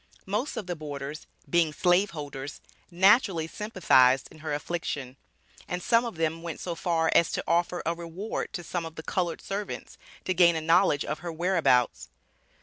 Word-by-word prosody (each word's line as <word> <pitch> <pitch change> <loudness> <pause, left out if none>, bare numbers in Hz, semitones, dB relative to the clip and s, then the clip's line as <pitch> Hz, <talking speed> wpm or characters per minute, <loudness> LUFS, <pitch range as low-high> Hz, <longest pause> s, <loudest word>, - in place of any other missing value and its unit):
Most 215 +9 -2
of 205 - -3
the 180 -1 -3
boarders, 145 -1 -7 0.2
being 170 -2 +2
slave 180 +4 +3
holders, 145 -4 -7 0.3
naturally 190 -2 +4
sympathized 160 - +3
in - - -15
her 155 -1 -5
affliction; 145 -4 -3 0.5
and 180 0 -4
some 235 0 +3
of 230 - -5
them 160 0 -1
went 170 -1 -6
so 175 - -3
far 165 -1 0
as 170 - +4
to - - -1
offer 175 +1 +1
a 165 - +1
reward 170 +5 -5
to 175 - -4
some 170 +1 -3
of 165 -1 -8
the 160 - -7
colored 175 -1 -2
servants 200 +1 -6 0.3
to 185 - +1
gain 170 -1 +5
a - - 0
knowledge 165 -2 +3
of 150 - -3
her 175 -1 -5
whereabouts. 165 -7 +1
170 Hz, 175 wpm, -27 LUFS, 155-180 Hz, 0.5 s, gain